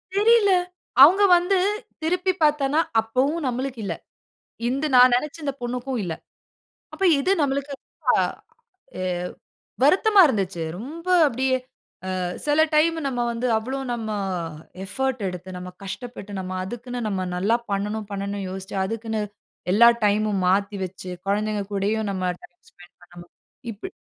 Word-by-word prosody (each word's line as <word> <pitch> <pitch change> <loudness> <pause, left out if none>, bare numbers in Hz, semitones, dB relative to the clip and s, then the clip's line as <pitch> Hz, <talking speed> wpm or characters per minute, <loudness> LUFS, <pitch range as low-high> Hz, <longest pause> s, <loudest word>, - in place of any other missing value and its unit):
தெரியல. 425 -1 +5 0.5
அவுங்க 380 +7 +7
வந்து 365 +2 +1 0.5
திருப்பி 360 +3 +1
பார்த்தேன்னா, 295 0 +2 0.2
அப்பவும் 270 +7 0
நம்மளுக்கு 255 0 -3
இல்லை. - - -3 0.7
இந்த 275 +4 -1
நான் 250 0 +8
நினைச்ச 300 +5 -2
இந்த 280 -2 -1
பொண்ணுக்கும் 250 +1 -3
இல்லை. 165 -2 -4 0.8
அப்ப, 390 - -4 0.2
இது 365 +8 +1
நம்மளுக்கு 280 0 -1
ரொம்ப - - -25 0.9
எ 185 - -2 0.8
வருத்தமா 390 +7 +5
இருந்துச்சு. 195 - -1
ரொம்ப 310 - -8 0.2
அப்படியே 260 0 0 0.6
அ - - -2 0.3
சில 295 +1 +3
டைம்மு, 325 +2 +3
நம்ம 245 -3 -1
வந்து 235 +2 -2
அவ்வளோ 260 +5 -3
நம்ம 225 -2 -4 0.7
எஃபர்ட்டு 255 0 -2
எடுத்து, 180 0 -7
நம்ம 180 0 -7
கஷ்டப்பட்டு, 210 0 -7
நம்ம 185 0 -5
அதுக்குன்னு 240 +4 -6
நம்ம 185 -2 -2
நல்லா 210 +6 +2 0.2
பண்ணணும், 210 +1 -2
பண்ணணும்ன்னு 200 -1 -4
யோசிச்சு, 190 +1 -6
அதுக்குன்னு 225 +1 -3 0.5
எல்லா 235 +4 +7 0.2
டைம்‌மும் 205 -2 +1
மாத்தி 200 +2 +1
வச்சு, 185 0 -8 0.2
குழந்தைங்க 210 0 0
கூடயும் 205 +2 0
நம்ம 185 -1 -3 0.2
டைம் 175 - -16
ஸ்பெண்ட் 175 0 -18
பண்ணணும், 175 0 -14 0.4
இப்டி. 220 - -8
235 Hz, 130 wpm, -24 LUFS, 200-280 Hz, 0.9 s, நான்